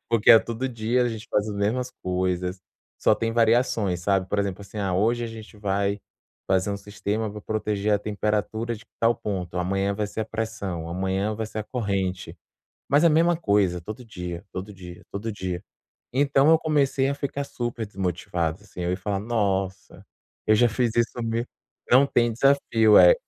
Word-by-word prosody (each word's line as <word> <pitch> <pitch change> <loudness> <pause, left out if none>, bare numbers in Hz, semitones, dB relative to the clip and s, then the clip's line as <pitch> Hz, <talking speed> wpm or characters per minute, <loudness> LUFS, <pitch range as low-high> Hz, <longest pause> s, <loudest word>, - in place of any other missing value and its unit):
Porque 115 -2 +4
é 115 - +11
todo 115 +3 -3
dia 120 0 0
a 120 - +1
gente 115 -1 -6
faz 105 0 +1
as 105 - -4
mesmas 120 +5 0
coisas, 90 0 -1 0.4
só - - +4
tem 115 0 -2
variações, 115 -5 +2
sabe? 95 0 +1
Por 105 - -1
exemplo 100 0 -2
assim, 100 +2 -9
ah 95 -3 0
hoje 115 +6 +2
a - - -3
gente 110 -1 -10
vai 100 0 0 0.5
fazer 95 +1 +2
um 100 - -3
sistema 105 +2 -3
para 105 0 -9
proteger 105 -1 -1
a 100 - +4
temperatura 105 +2 -1
de 110 - -11 0.2
tal 115 +1 +3
ponto, 95 -6 -4
amanhã 95 +2 0
vai 105 0 -1
ser 110 - -5
a - - 0
pressão, 110 -7 -4
amanhã 95 +4 -1
vai 110 - -2
ser 110 - -6
a 110 - -1
corrente. 100 -6 -2 0.5
Mas 145 +2 +4
a - - +8
mesma 170 +3 +4
coisa, 100 - +2
todo 110 +8 -8
dia, 90 -4 -6
todo 95 +3 -6
dia, 90 -2 -11
todo 110 +3 -4
dia. 95 -3 -4 0.5
Então 140 +2 +3
eu 160 - +7
comecei 145 -4 +1
a - - 0
ficar 140 0 -3
super 120 -4 -4
desmotivado 90 -2 -2
assim, 95 -3 -9
eu 85 - -1
ia 90 - 0
falar: 100 0 -2
"Nossa, 100 -4 -2 0.4
eu 110 - +6
já 120 +3 +5
fiz 120 +1 0
isso, 120 +1 0
mi" 115 +1 -1 0.5
não 135 +3 +7
tem 120 -3 +2
desafio, 115 -4 +4
é. - - +9
105 Hz, 190 wpm, -25 LUFS, 95-115 Hz, 0.5 s, é